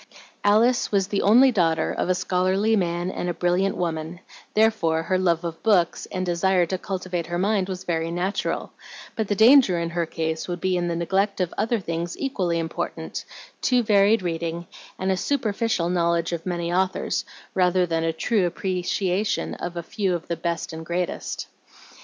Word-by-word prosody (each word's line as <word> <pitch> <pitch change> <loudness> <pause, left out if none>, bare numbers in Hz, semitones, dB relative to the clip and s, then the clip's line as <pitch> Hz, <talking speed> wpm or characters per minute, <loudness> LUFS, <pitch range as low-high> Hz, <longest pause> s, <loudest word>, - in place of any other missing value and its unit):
Alice 225 +5 +3
was 195 -2 +1
the 200 - 0
only 250 +6 +6
daughter 165 -7 +1
of - - -2
a 185 - +3
scholarly 185 +4 +1
man 175 -2 -1
and 180 - -3
a 175 - -2
brilliant 180 +2 +1
woman; 165 0 -3 0.4
therefore 210 -8 +2
her 185 +2 0
love 170 -2 +1
of 165 -1 -5
books 190 -6 +2
and 185 -1 -3
desire 180 +1 +2
to 185 +2 -3
cultivate 185 -3 -4
her 175 - -2
mind 195 0 +1
was 185 -1 -5
very 165 -1 -1
natural, 180 +4 -2 0.4
but 220 -2 -1
the 205 - 0
danger 225 -4 +6
in 170 0 -2
her 170 -1 -1
case 160 0 -3
would 175 -1 -4
be 185 +1 0
in 175 -1 0
the 170 - -1
neglect 195 +5 0
of 180 -2 -1
other 225 +2 0
things 170 -1 -4
equally 185 -11 -1
important, 165 -1 -4 0.4
too 250 -2 +3
varied 205 0 +4
reading, 170 0 -3 0.3
and 190 0 0
a - - +2
superficial 220 -4 0
knowledge 170 -1 +1
of 170 +1 -4
many 175 -1 -2
authors 185 +1 0 0.3
rather 180 0 +3
than 165 -1 -1
a 165 - +1
true 185 +4 +1
appreciation 185 +2 -1
of 175 0 -6
a 170 - -3
few 190 0 -1
of 170 - -6
the 170 - -1
best 170 0 -3
and 160 0 -6
greatest. 175 +2 -3
180 Hz, 180 wpm, -24 LUFS, 170-195 Hz, 0.4 s, only